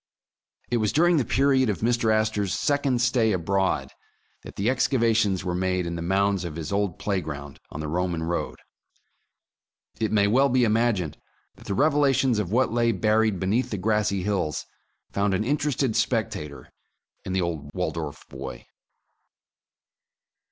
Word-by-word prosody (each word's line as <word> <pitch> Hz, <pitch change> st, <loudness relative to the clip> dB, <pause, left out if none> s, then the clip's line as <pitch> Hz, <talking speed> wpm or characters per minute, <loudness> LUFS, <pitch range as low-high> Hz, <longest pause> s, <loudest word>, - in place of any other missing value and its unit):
It 120 Hz, -, +2 dB
was 110 Hz, -2 st, +1 dB
during 175 Hz, +2 st, +4 dB
the 140 Hz, -, +2 dB
period 130 Hz, 0 st, +2 dB
of 105 Hz, -, -2 dB
Mr. 115 Hz, -1 st, +2 dB
Astor 110 Hz, -2 st, +1 dB
's 90 Hz, -, -2 dB
second 140 Hz, -4 st, +1 dB
stay 120 Hz, -3 st, +2 dB
abroad, 95 Hz, +2 st, 0 dB, 0.5 s
that -, -, -11 dB
the 100 Hz, -, -1 dB
excavations 115 Hz, -7 st, +2 dB
were 90 Hz, -1 st, -2 dB
made 90 Hz, 0 st, 0 dB
in 85 Hz, 0 st, -3 dB
the 85 Hz, -, -4 dB
mounds 95 Hz, +2 st, +1 dB
of 85 Hz, -3 st, -5 dB
his 80 Hz, 0 st, -5 dB
old 100 Hz, -3 st, -1 dB
playground 75 Hz, -8 st, -4 dB
on 75 Hz, -, -6 dB
the 75 Hz, -, -4 dB
Roman 85 Hz, 0 st, -1 dB
road. 85 Hz, +1 st, -3 dB, 1.4 s
It 110 Hz, -1 st, 0 dB
may 105 Hz, -2 st, +3 dB
well 130 Hz, +7 st, +3 dB
be 125 Hz, -1 st, +3 dB
imagined 110 Hz, -8 st, +1 dB, 0.3 s
that -, -, -16 dB
the 100 Hz, -, -1 dB
revelations 135 Hz, -4 st, +3 dB
of 95 Hz, -3 st, -3 dB
what 125 Hz, 0 st, +2 dB
lay 120 Hz, 0 st, +2 dB
buried 110 Hz, 0 st, +1 dB
beneath 105 Hz, +7 st, 0 dB
the 105 Hz, -, -3 dB
grassy 100 Hz, -1 st, 0 dB
hills 95 Hz, -7 st, -1 dB, 0.5 s
found 100 Hz, -1 st, +1 dB
an 105 Hz, -, 0 dB
interested 140 Hz, -2 st, 0 dB
spectator 105 Hz, -, -2 dB, 0.5 s
in 95 Hz, -, -4 dB
the 95 Hz, -, +1 dB
old 80 Hz, -5 st, -3 dB
Waldorf 80 Hz, -4 st, -4 dB
boy. -, -, -8 dB
105 Hz, 155 wpm, -25 LUFS, 90-120 Hz, 1.4 s, during